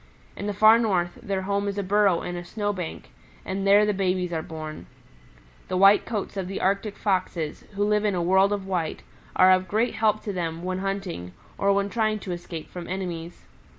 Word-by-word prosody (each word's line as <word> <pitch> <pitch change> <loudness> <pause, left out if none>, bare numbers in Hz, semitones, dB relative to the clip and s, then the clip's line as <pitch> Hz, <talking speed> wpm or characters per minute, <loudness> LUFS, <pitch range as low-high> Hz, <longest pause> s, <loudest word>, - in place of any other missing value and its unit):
In 205 - -5
the 205 - -1
Far 215 +3 +7
North, 180 -6 0
their 195 -1 -2
home 200 +1 -1
is 200 0 -3
a 200 - -1
burrow 195 -2 +3
in 175 - -4
a 175 - -5
snow 205 +3 -2
bank, 180 -4 -6 0.3
and 195 +1 -2
there 205 +1 +6
the 210 - +1
babies 185 -2 0
are 160 - -1
born. 155 -1 -8 0.8
The 185 - -1
white 195 +2 +6
coats 210 -4 -3
of 190 -2 -2
the 195 - -4
Arctic 200 +2 0
Foxes, 185 -6 -1
who 200 +1 0
live 210 0 +2
in 205 -3 +1
a 175 - 0
world 190 +3 +4
of 200 -2 -2
white, 180 -4 -2 0.3
are 185 0 +7
of 185 0 +3
great 220 +6 +1
help 215 -1 +1
to 205 - -3
them 165 -2 -3
when 185 0 -2
hunting, 190 - -4 0.2
or 200 0 +2
when 200 0 +2
trying 215 -2 +1
to 185 - -5
escape 175 -2 -6
from 175 -1 -7
enemies. 175 -3 -5
195 Hz, 210 wpm, -25 LUFS, 175-205 Hz, 0.8 s, Far